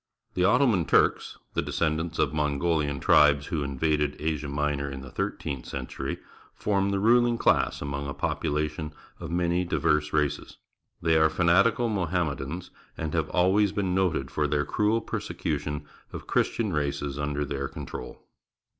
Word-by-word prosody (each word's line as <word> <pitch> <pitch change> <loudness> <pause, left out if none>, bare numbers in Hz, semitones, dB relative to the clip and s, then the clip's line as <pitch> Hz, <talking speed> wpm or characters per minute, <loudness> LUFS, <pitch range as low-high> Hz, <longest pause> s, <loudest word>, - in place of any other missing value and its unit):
The 90 - 0
Ottoman 100 - +3
Turks, - - +2 0.2
the - - +1
descendants 80 +1 -1
of 70 - +1
Mongohan 75 0 0
tribes 70 -1 +5
who 80 -5 -2
invaded 75 +1 0
Asia 75 -2 -2
Minor 70 0 -1
in 65 -1 -7
the^thirteenth 65 -1 -4
century, 65 - -4 0.4
form 100 -1 0
the 100 - 0
ruHng 120 +3 +4
class - - +2
among 70 0 -4
a 70 - -4
population 75 0 -2 0.3
of - - -6
many 85 +1 +1
diverse 75 -3 +1
races. 75 -1 -1 0.5
They 80 -1 +4
are 80 0 +5
fanatical 95 +9 +3
Mohammedans 90 -5 -2 0.3
and 80 -1 -3
have 80 -2 0
always 95 +3 +3
been 95 -3 -1
noted 85 -8 0
for 75 -1 0
their 75 0 0
cruel 110 +2 +1
persecution 75 -7 -3 0.3
of - - -7
Christian 110 -5 0
races 70 -1 -2
under 75 0 -1
their 70 -1 -3
control. 60 - -8
75 Hz, 145 wpm, -27 LUFS, 70-90 Hz, 0.5 s, tribes